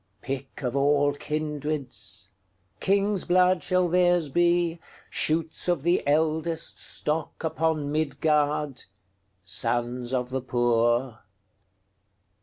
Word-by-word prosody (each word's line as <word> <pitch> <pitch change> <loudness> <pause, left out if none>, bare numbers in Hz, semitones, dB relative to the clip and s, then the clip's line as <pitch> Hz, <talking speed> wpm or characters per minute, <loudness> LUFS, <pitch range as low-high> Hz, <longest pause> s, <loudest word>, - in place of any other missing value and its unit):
Pick 135 +2 -6
of 125 0 -2
all 145 +1 +3
kindreds, 140 -10 -4 0.5
King's 200 0 +2
blood 180 0 +3
shall 185 +2 +2
theirs 175 -2 +3
be, 175 +1 +2 0.3
Shoots 160 +2 0
of 175 -6 +1
the 175 +2 +2
eldestStock 160 0 0
upon 160 -2 0
Midgard, 150 -2 0 0.6
Sons 120 +6 -1
of 125 -1 -1
the 130 0 -2
poor. 120 -1 +1
150 Hz, 90 wpm, -26 LUFS, 130-165 Hz, 0.6 s, all